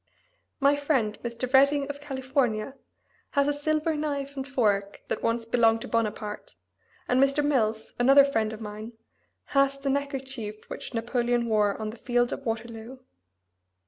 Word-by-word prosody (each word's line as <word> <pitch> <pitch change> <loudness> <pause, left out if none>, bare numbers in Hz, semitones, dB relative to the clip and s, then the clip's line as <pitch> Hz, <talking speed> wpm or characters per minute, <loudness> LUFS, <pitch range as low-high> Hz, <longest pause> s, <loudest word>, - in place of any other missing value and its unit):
My 280 +1 +4
friend, 270 -8 0
Mr. 240 +2 -4
Redding, 280 +1 +5
of 285 0 -6
California, 265 -4 -1 0.6
has 280 0 +4
a 290 - +2
silver 310 +2 0
knife 285 -2 -3
and 270 0 -4
fork 205 -7 0
that - - -2
once 230 0 0
belonged 225 -1 +3
to - - -6
Bonaparte, 215 -2 -3 0.5
and 250 +1 +3
Mr. 275 +2 +3
Mills, 220 -6 0
another 275 +3 +7
friend 225 -6 0
of 220 - -7
mine, 215 +2 -7 0.6
has 275 0 +3
the 275 0 -1
neckerchief 265 -6 -4
which - - -6
Napoleon 240 +1 0
wore 210 -3 +1
on 215 -1 -3
the 230 - -12
field 245 0 +1
of 275 - -6
Waterloo. 225 +2 -5
250 Hz, 150 wpm, -27 LUFS, 225-275 Hz, 0.6 s, another